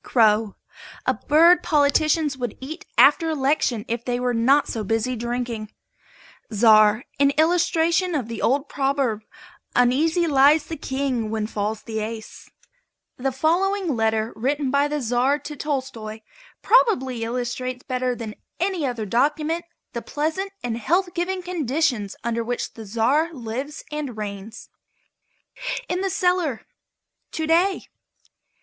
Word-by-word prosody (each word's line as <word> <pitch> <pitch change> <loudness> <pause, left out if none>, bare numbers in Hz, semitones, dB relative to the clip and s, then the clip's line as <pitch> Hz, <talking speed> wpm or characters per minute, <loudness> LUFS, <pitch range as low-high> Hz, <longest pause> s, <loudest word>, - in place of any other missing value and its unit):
CROW. 215 -3 +3 0.5
A - - +3
bird 335 +4 +5
politicians 300 0 +2
would 245 -4 -5
eat 310 +6 -8
after 330 -2 +6
election 270 -6 0
if 235 0 -3
they 245 0 -1
were 250 0 0
not 265 +6 +3
so 220 - -3
busy 225 +4 -1
drinking. 235 -2 -4 0.8
CZAR. 215 +1 +5 0.2
An 280 0 +5
illustration 340 +1 +2
of 255 -7 -2
the 230 - -6
old 275 +3 +1
proverb, 270 -5 0 0.5
"Uneasy 305 +8 +3
lies 290 0 +4
the 325 - -5
King 265 -5 -2
when 220 -1 -2
falls 215 0 -3
the 220 -1 -4
Ace." 220 0 -7 0.7
The 270 +1 -1
following 345 +4 +1
letter 220 0 0
written 270 +3 -1
by 280 +1 +3
the 295 0 -2
Czar 250 +4 +2
to 295 +1 -8
Tolstoi 260 -7 -4 0.4
probably 265 - +3
illustrates 250 +2 -3
better 255 -1 -1
than 225 -3 -6 0.3
any 355 -4 0
other 240 -4 -3
document 300 - 0 0.3
the 235 - -3
pleasant 320 +9 -2
and 235 -1 -2
health 350 - +1
giving 365 +1 -2
conditions 290 - -1
under 235 0 -1
which 245 +1 -3
the 225 -2 -10
Czar 260 +10 +1
lives 260 +5 -5
and 290 -6 -4
reigns: 210 +1 -7 1.2
In 360 +1 -1
The 390 - 0
Cellar, 360 - 0 0.7
To 320 - -2
day. 345 +5 +2
265 Hz, 135 wpm, -23 LUFS, 230-315 Hz, 1.2 s, after